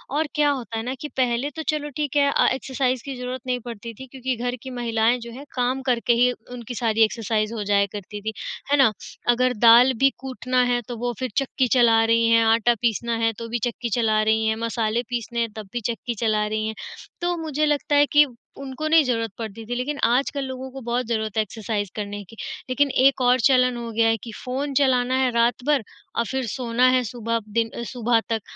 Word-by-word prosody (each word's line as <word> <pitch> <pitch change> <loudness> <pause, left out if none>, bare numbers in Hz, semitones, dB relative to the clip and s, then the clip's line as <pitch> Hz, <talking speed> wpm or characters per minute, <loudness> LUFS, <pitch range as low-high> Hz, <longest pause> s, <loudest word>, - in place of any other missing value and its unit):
और 310 0 +1
क्या 295 -1 +3
होता 235 -5 -3
है 225 - -3
ना 255 +2 -3
कि 300 - -4
पहले 250 +2 +1
तो 320 - -4
चलो 295 -1 -1
ठीक 295 -1 -2
है 280 -1 +4
अ, - - +3
एक्सरसाइज़ 260 -1 -1
की 275 -2 -5
ज़रूरत 250 0 -5
नहीं 250 -1 0
पड़ती 230 +1 -7
थी, 265 +4 -11
क्योंकि 260 0 -3
घर 245 +2 -2
की 260 - -7
महिलाएँ 230 +1 +2
जो 235 0 -9
हैं 275 +5 -10
काम 255 +2 0
करके 235 0 +2
ही 250 - +4 0.2
उनकी 245 -1 -7
सारी 225 -1 +2
एक्सरसाइज़ 220 0 0
हो 215 -2 -3
जाया 200 0 +3
करती 205 +1 -7
थी, 220 +1 -4 0.4
है 290 - +5
ना? 260 -6 +5 0.4
अगर 250 +1 +3
दाल 245 +3 +8
भी 270 0 +5
कूटना 255 -1 0
है 245 0 +1
तो 240 - -5
वो 245 +1 -2
फिर 255 - -2
चक्की 270 -1 +1
चला 230 -2 +4
रही 230 0 +3
हैं, 230 0 +5
आटा 230 +1 +4
पीसना 235 0 0
है 225 0 +1
तो 230 - -6
भी 240 +1 -1
चक्की 240 -1 -2
चला 220 -3 +2
रही 220 0 +2
हैं, 220 - +1
मसाले 230 0 -1
पीसने 235 -1 -3
हैं 230 -2 0
तब 215 -2 -7
भी 240 - -1
चक्की 235 +1 -3
चला 215 -2 +1
रही 215 0 -2
हैं, 220 - -4 0.5
तो 350 0 0
मुझे 305 -2 -1
लगता 295 0 +1
है 290 0 +6
कि 295 0 +7 0.3
उनको 275 +2 -5
नहीं 320 -1 +5
ज़रूरत 230 -4 -1
पड़ती 225 -1 -7
थी, 245 +2 -4
लेकिन 285 +4 -2
आजकल 275 +3 +1
लोगों 260 0 -6
को 270 0 -8
बहुत 240 +1 -1
ज़रूरत 220 -2 -2
है - - +5
एक्सरसाइज़ 210 -1 -4
करने 205 -1 -5
की। 225 - -13 0.3
लेकिन 280 +2 +2 0.2
एक 275 -1 +4
और 250 0 +4
चलन 250 -2 +3
हो 235 -1 -5
गया 225 +1 +2
है 225 0 +2
कि 230 - -7
फ़ोन 270 +3 -3
चलाना 255 -1 +2
है 255 - +2
रात 235 +1 +2
भर 290 -6 +3 0.3
और 235 - +1
फिर 265 -1 -1
सोना 245 +1 +1
है 250 - +1
सुबह 230 0 -2
दिन 225 +1 -1 0.2
सुबह 240 -2 +2
तक, 225 -2 0
240 Hz, 225 wpm, -23 LUFS, 225-260 Hz, 0.5 s, दाल